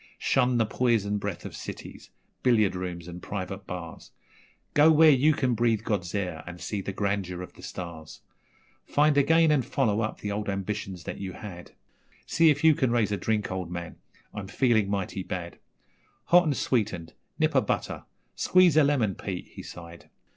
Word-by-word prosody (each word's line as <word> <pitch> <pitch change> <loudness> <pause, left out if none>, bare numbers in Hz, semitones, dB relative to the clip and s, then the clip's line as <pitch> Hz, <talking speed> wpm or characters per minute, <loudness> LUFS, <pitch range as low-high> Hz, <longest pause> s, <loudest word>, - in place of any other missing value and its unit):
Shun 125 -1 +2
the 115 - +3
poison 105 -3 +1
breath 100 -3 -5
of - - -7
cities - - -9 0.3
billiard 110 -7 +3
rooms 90 -2 -5
and 90 0 -8
private 95 0 -5
bars, 85 -2 -7 0.6
Go 150 +2 +6
where 160 0 +7
you 145 +3 +4
can 130 -4 0
breathe 115 -2 +1
God's 95 -5 -2
air 90 -5 -3
and 90 0 -8
see 100 +4 -3
the 100 - -4
grandeur 95 -2 -2
of - - -11
the - - -15
stars! 85 -4 -8 0.7
Find 150 0 +3
again 160 +3 +4
and 145 -4 +3
follow 110 -4 0
up 110 - -3
the 105 - -3
old 105 0 -3
ambitions 100 -2 -4
that - - -6
you 95 -2 -5
had 90 -4 -10 0.5
See 165 0 +4
if 145 0 +1
you 160 -1 +7
can 130 -3 +1
raise 115 -3 +1
a 100 - 0
drink, 105 +2 -1
old 95 -2 -4
man, 85 -1 -6 0.4
I'm 100 -3 -6
feelin' 110 -1 +2
mighty 100 -1 -2
bad 90 -2 -6 0.6
Hot 175 0 +5
and 145 -4 0
sweetened, 105 -9 -1 0.2
nip - - +1
o' - - +6
butter - - -3 0.3
squeeze 180 -4 +5
o' - - +6
lemon, 130 -8 +2
Pete,' 90 -1 -6
he - - -9
sighed. 85 -1 -11
105 Hz, 180 wpm, -27 LUFS, 90-125 Hz, 0.7 s, where